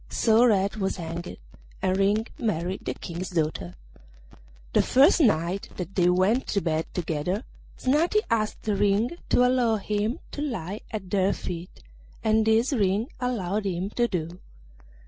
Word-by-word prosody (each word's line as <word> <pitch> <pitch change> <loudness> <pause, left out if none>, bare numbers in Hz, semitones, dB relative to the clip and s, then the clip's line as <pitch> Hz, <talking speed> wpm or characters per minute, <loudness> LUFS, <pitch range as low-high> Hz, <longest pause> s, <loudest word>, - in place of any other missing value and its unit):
So 225 +1 +4
Red 200 -1 +2
was 195 -2 -1
hanged, 170 0 -6 0.4
and 185 0 +1
Ring 205 +3 +2
married 185 -3 -2
the - - -2
King's 175 +1 -6
daughter. 155 - -2 1.0
The - - +5
first 285 +7 +5
night 185 - +1
that 180 +1 -5
they 180 -2 +3
went 190 +8 +2
to 200 - 0
bed 160 -2 -1
together 180 - -2 0.3
Snati 325 +11 +2
asked 215 -2 -1
Ring 205 +2 +2 0.2
to 250 - +4
allow 250 -3 +2
him 210 +2 -1
to 290 - -5
lie 210 - -4
at 200 -4 -6
their 195 -1 +2
feet, 175 - -7 0.4
and 220 0 +3
this 225 +6 +3
Ring 210 +1 +1
allowed 215 -5 -1
him 185 +2 -2
to 240 +1 +1
do. 175 -2 -4
200 Hz, 145 wpm, -26 LUFS, 180-225 Hz, 1.0 s, The